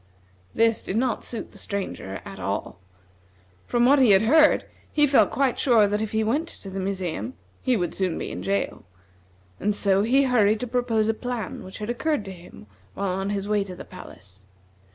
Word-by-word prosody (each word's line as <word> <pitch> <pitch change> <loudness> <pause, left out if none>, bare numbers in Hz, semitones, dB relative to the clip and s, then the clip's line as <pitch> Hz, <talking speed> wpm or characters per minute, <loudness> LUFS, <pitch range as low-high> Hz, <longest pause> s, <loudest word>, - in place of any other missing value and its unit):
This 225 -1 +3
did 195 - -3
not 250 0 0
suit 235 - -4
the - - -10
Stranger 190 - -4
at - - -9
all. - - -4 0.9
From 240 0 +2
what 280 +3 +6
he 255 -4 +5
had 195 +1 +6
heard 305 +7 +5 0.3
he 295 -1 +4
felt 275 -1 +4
quite 270 -3 0
sure 235 -5 +5
that 205 +1 0
if 220 - -3
he 220 0 +1
went 285 +10 0
to 195 - -9
the 195 - -4
museum, 190 +4 -3 0.3
he 255 -3 +2
would 175 -4 -2
soon 185 -3 -1
be - - -4
in 90 - -5
jail; 100 +1 -2 0.8
and 210 0 0
so 195 -1 +2
he 255 +6 +3
hurried 220 -5 +3
to - - -1
propose 235 -3 0
a 225 - +2
plan 245 0 -5
which 190 - -9
had 210 +1 -5
occurred 290 -1 -1
to 195 - -6
him 175 - -13 0.3
while 200 - -2
on 195 +2 -2
his 200 -1 -2
way 210 -1 +1
to 185 -2 -8
the - - -10
palace. 95 +1 -13
210 Hz, 200 wpm, -25 LUFS, 190-245 Hz, 0.9 s, what